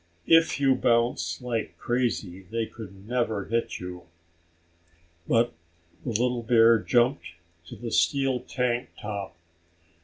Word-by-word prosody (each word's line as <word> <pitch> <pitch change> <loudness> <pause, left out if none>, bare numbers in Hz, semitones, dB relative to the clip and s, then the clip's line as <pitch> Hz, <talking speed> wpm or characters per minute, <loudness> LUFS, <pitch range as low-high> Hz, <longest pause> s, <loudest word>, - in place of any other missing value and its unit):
If 165 -2 +4
you 135 -1 +4
bounce 120 0 +1
like 115 -3 -3
crazy 100 -7 -1
they 115 +1 -1
could 100 -3 -11
never 110 -4 -1
hit 115 +1 -2
you." 90 -1 -8 1.2
But 115 +1 +2 0.5
the - - -4
little 120 +2 0
bear 115 0 +5
jumped 120 - +1 0.3
to - - -9
the 120 -1 -6
steel 135 -2 +2
tank 125 -1 -2
top. 100 -4 -5
115 Hz, 120 wpm, -26 LUFS, 110-125 Hz, 1.2 s, bear